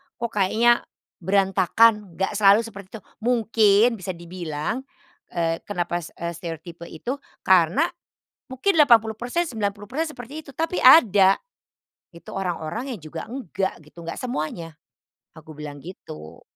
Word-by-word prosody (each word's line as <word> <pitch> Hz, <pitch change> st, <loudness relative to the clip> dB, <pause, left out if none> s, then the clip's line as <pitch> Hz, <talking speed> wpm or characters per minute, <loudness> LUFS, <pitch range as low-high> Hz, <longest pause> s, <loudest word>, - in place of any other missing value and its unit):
kok 235 Hz, -1 st, -4 dB
kayaknya 220 Hz, +4 st, +3 dB, 0.4 s
berantakan, 195 Hz, +2 st, +2 dB
gak 195 Hz, +2 st, -2 dB
selalu 205 Hz, +2 st, +6 dB
seperti 200 Hz, -4 st, -10 dB
itu. -, -, -27 dB, 0.2 s
Mungkin 225 Hz, -1 st, +3 dB
bisa 185 Hz, +1 st, -4 dB
dibilang, 170 Hz, -, -4 dB, 0.5 s
eee, 165 Hz, -1 st, -1 dB
kenapa, 175 Hz, -3 st, -2 dB
eee, 170 Hz, +1 st, -6 dB
stereotipe 170 Hz, +1 st, -8 dB
itu 240 Hz, -, -4 dB, 0.3 s
karena 190 Hz, -, +4 dB, 0.6 s
mungkin 265 Hz, +10 st, 0 dB
80%, 240 Hz, +2 st, +3 dB
90% 220 Hz, +7 st, -3 dB
seperti 275 Hz, +6 st, -8 dB
itu -, -, -10 dB
tapi 330 Hz, +5 st, -2 dB
ada 205 Hz, -, +7 dB, 0.8 s
itu 170 Hz, -, -12 dB
orang-orang 195 Hz, -, -4 dB
yang 205 Hz, -, -12 dB
juga 160 Hz, +1 st, -7 dB
enggak 195 Hz, -8 st, -4 dB
gitu, 150 Hz, +3 st, -16 dB
enggak 170 Hz, -, -6 dB
semuanya," 165 Hz, -8 st, -4 dB, 0.6 s
aku 160 Hz, -1 st, -13 dB
bilang 145 Hz, -1 st, -8 dB
gitu. 80 Hz, -, -11 dB
200 Hz, 125 wpm, -23 LUFS, 170-235 Hz, 0.8 s, ada